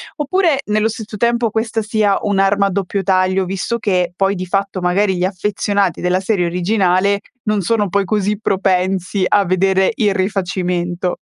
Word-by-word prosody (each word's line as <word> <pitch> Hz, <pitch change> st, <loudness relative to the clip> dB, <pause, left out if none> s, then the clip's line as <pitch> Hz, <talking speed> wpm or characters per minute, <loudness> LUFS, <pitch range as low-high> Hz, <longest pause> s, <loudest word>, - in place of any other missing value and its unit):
Oppure, 320 Hz, -1 st, +1 dB
nello 215 Hz, +1 st, +1 dB
stesso 220 Hz, -1 st, -6 dB
tempo 235 Hz, 0 st, +1 dB
questa 225 Hz, +1 st, -1 dB
sia 210 Hz, -2 st, +1 dB
un'arma 200 Hz, 0 st, +2 dB
a -, -, -1 dB
doppio 195 Hz, +1 st, -2 dB
taglio? 185 Hz, 0 st, +2 dB
Visto 195 Hz, +5 st, -3 dB
che 180 Hz, -4 st, 0 dB
poi, 195 Hz, +1 st, +1 dB
di 185 Hz, 0 st, -4 dB
fatto, 195 Hz, +1 st, -2 dB
magari 190 Hz, +1 st, +1 dB
gli 180 Hz, -, +1 dB
affezionati 200 Hz, -1 st, -1 dB
della 180 Hz, +1 st, +1 dB
serie 190 Hz, -3 st, 0 dB
originale 185 Hz, +2 st, +1 dB, 0.2 s
non 215 Hz, -1 st, 0 dB
sono 210 Hz, +2 st, 0 dB
poi 200 Hz, +2 st, 0 dB
così 210 Hz, 0 st, -1 dB
propensi 190 Hz, -1 st, 0 dB
a 205 Hz, -1 st, +3 dB
vedere 190 Hz, +2 st, +2 dB
il 205 Hz, -3 st, +1 dB
rifacimento. 180 Hz, -2 st, -1 dB
195 Hz, 160 wpm, -17 LUFS, 185-210 Hz, 0.2 s, a